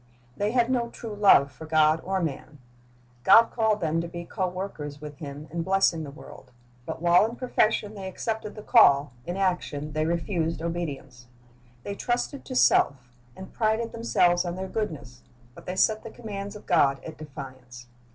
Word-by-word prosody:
"^ - - -31 0.3
They 205 +1 0
had 240 +1 +2
no 240 -2 0
true 230 -2 -8
love 195 -9 +5
for 145 +5 -11
God 155 0 +3
or 190 -1 -1
man. 150 -1 -5 0.7
God 225 - +7
called 220 -2 +1
them 165 0 0
to 170 - -5
be 170 0 -7
co 185 +2 -2
workers 180 -6 -6
with 150 -1 -9
Him 145 0 -8
in 170 +1 -2
blessing 190 -2 +2
the 145 - -7
world; 140 -2 -13 0.4
but - - -6
while 175 +2 +6
in 230 - -7
profession 220 -4 0
they 195 -2 -7
accepted 215 +2 -4
the 215 - -9
call, 145 - +5
in 175 +2 -3
action 175 -6 -1
they 155 +1 0
refused 170 -1 -1
obedience. 145 -7 -5 0.6
They 200 - -4
trusted 245 +6 -2
to 255 - -6
self, 125 - +3 0.2
and 190 +3 -11
prided 225 +1 0
themselves 175 -7 +2
on 175 -1 -4
their 190 +1 -5
goodness; 145 - -5 0.3
but - - -15
they 180 - -3
set 215 +3 +2
the 225 - -9
commands 205 -3 -7
of 210 - -11
God 140 -7 +3
at 160 - -9
defiance. 130 -4 -10
175 Hz, 180 wpm, -26 LUFS, 150-210 Hz, 0.7 s, God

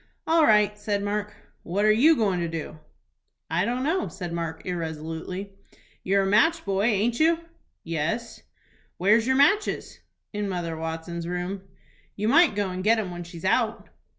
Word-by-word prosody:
"All 325 -1 +4
right," 210 -1 +4
said 205 -1 -1
Mark. 205 +1 -3 0.3
"What 200 +5 -1
are 215 - +6
you 285 +10 +5
goin' 200 -8 +1
to 170 - -1
do?" 160 -1 -6 0.7
"I - - +1
don't 245 +2 -1
know," 340 +6 0
said 175 -3 -6
Mark, 165 -1 -4
irresolutely. 165 +3 -5 0.5
"You're 195 +1 +2
a - - 0
match 230 +13 +3
boy, 195 +1 0
aint 225 +1 +1
you?" 325 +1 +4 0.5
"Yes." 170 +9 -3 0.6
"Where's 215 +5 +3
your 260 - +3
matches?" 315 +10 +2 0.3
"In 205 -1 -2
Mother 175 -3 -3
Watson's 165 +1 -5
room." 180 +2 -3 0.5
"You 210 +1 -2
might 320 0 +5
go 200 -2 -1
and 185 0 -4
get 225 +3 +4
'em 200 -5 -3
when 175 0 -6
she's 170 0 -10
out." 225 +3 0
200 Hz, 165 wpm, -25 LUFS, 175-230 Hz, 0.7 s, are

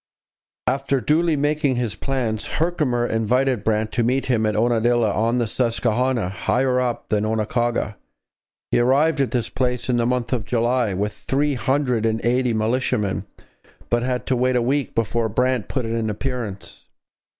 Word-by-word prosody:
After 135 +1 +1
duly 160 +4 +2
making 145 -1 +1
his 120 -3 -1
plans, 120 -6 -2
Herkimer 150 -8 +1
invited 120 +1 +1
Brant 110 0 0
to 120 - 0
meet 130 +3 +1
him 115 -4 +1
at 105 - 0
Unadilla, 120 0 +2
on 115 +4 +1
the 120 - +1
Susquehanna, 120 0 0
higher 125 +6 +1
up 125 -2 -2
than 105 -1 +1
Oquaga. 110 0 -1 0.7
He - - +3
arrived 140 +5 +3
at 135 - +1
this 120 -2 -1
place 125 -1 -2
in 125 - +2
the 120 0 +1
month 125 0 -1
of 120 -4 0
July 120 -1 0
with 105 +2 -1
three 145 +2 -1
hundred 125 -2 0
and 110 0 0
eighty 125 +1 +2
militiamen, 110 -3 0 0.6
but 120 0 +2
had 125 0 -2
to 130 - +1
wait 125 +1 +1
a 125 - +3
week 135 +3 -1
before 115 0 0
Brant 125 0 0
put 130 -4 -2
in 115 - -3
an 115 -1 -1
appearance. 110 -3 -5
120 Hz, 165 wpm, -22 LUFS, 110-130 Hz, 0.7 s, He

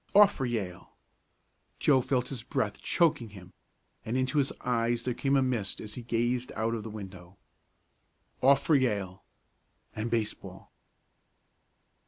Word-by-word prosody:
Off 205 0 +8
for 135 - -2
Yale. 100 -7 -4 0.8
Joe 135 -3 +4
felt 125 -1 0
his 130 -5 -4
breath 105 -3 -2
choking 150 -9 +2
him, 95 -3 -13 0.5
and 115 +3 -2
into 130 +3 +1
his 140 - +1
eyes 120 -1 0
there 125 - -1
came 135 +3 +1
a 135 - +4
mist 120 -7 -2
as 105 -1 -7
he 125 - -6
gazed 120 +1 -1
out 110 +1 0
of 115 - -2
the 110 - -7
window. 95 -3 -10 1.0
Off 135 +1 +5
for 160 - +2
Yale 105 -9 0 0.7
and 110 +2 -2
baseball! 115 -2 -3
120 Hz, 145 wpm, -29 LUFS, 105-130 Hz, 1.0 s, Off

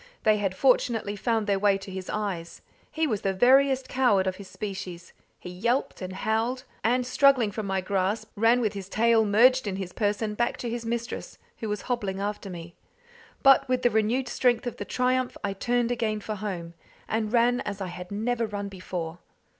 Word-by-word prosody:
They 215 -1 +4
had 195 -2 -1
fortunately 230 -4 +2
found 225 +1 0
their 200 -1 +1
way 200 -1 +3
to 195 0 -10
his 185 -1 -6
eyes. 195 -6 -4 0.3
He 320 0 0
was 215 -9 -1
the 195 -1 -1
veriest 265 +4 +4
coward 240 -8 +3
of 185 0 -2
his 200 - -10
species. 185 -3 -7 0.3
He 180 - -8
yelped 235 +9 -1
and 185 0 -5
howled, 225 +6 -1 0.2
and 245 +2 +2
struggling 255 -4 +4
from 210 0 -4
my 190 -1 0
grasp 200 +3 -1
ran 230 +3 +4
with 215 -4 0
his 195 -2 -7
tail 225 +1 +3
merged 235 +4 +4
in 195 - -2
his 190 -2 -5
person 210 0 -1
back 235 +3 0
to 240 - -4
his 235 -1 -4
mistress, 235 0 -4 0.2
who 220 - -4
was 210 -1 -3
hobbling 205 -6 -2
after 205 0 -3
me. 170 -1 -8 0.7
But 270 -1 +6
with 255 0 +1
the 245 - +4
renewed 225 +4 +1
strength 245 0 +1
of 245 - -3
triumph 255 0 0
I 200 -1 -1
turned 240 +4 0
again 225 -3 -1
for 215 +1 -5
home, 185 -5 -5 0.3
and 215 -1 -1
ran 245 +1 +3
as 205 -1 -5
I 195 - -3
had 180 0 -8
never 230 +3 -1
run 205 -1 -4
before. 180 -3 -6
215 Hz, 195 wpm, -27 LUFS, 195-240 Hz, 0.7 s, But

